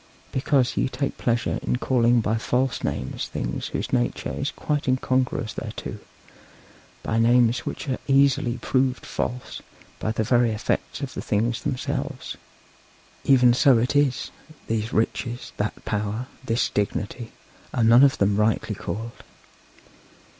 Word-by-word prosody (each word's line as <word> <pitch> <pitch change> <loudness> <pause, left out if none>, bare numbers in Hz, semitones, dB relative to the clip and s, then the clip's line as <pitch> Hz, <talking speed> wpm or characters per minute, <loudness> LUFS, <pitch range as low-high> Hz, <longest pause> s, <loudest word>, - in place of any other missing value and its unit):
Because 130 -1 +1
ye - - +1
take 140 +1 -3
pleasure 120 +2 0
in - - 0
calling 120 -1 +3
by 110 +1 0
false 125 +3 0
names 65 - -3
things - - -3
whose - - -4
nature - - 0
is - - -2
quite 145 -2 -2
incongruous 130 -3 0
thereto - - -6 1.0
by 110 - 0
names 120 +1 +3
which - - -5
are 130 - -1
easily 135 -3 +3
proved 130 +1 0
false 125 +1 -4 0.4
by 110 - -1
the 110 0 0
very 120 +1 +3
effects 105 - -2
of - - -4
the - - -4
things 115 +3 0
themselves; 135 -4 -3 0.9
even 125 -3 +6
so 130 0 +5
it 125 +5 0
is; 145 -3 +2 0.3
these 110 0 -2
riches, 120 +2 -1
that 105 +1 -3
power, 105 +3 -2 0.2
this 115 -2 +1
dignity, 105 +3 -2 0.4
are 120 - +1
none 120 +4 +7
of 140 -1 +5
them 100 0 +2
rightly 105 0 +1
so - - -10
called. 115 +3 -5
120 Hz, 140 wpm, -24 LUFS, 110-130 Hz, 1.0 s, none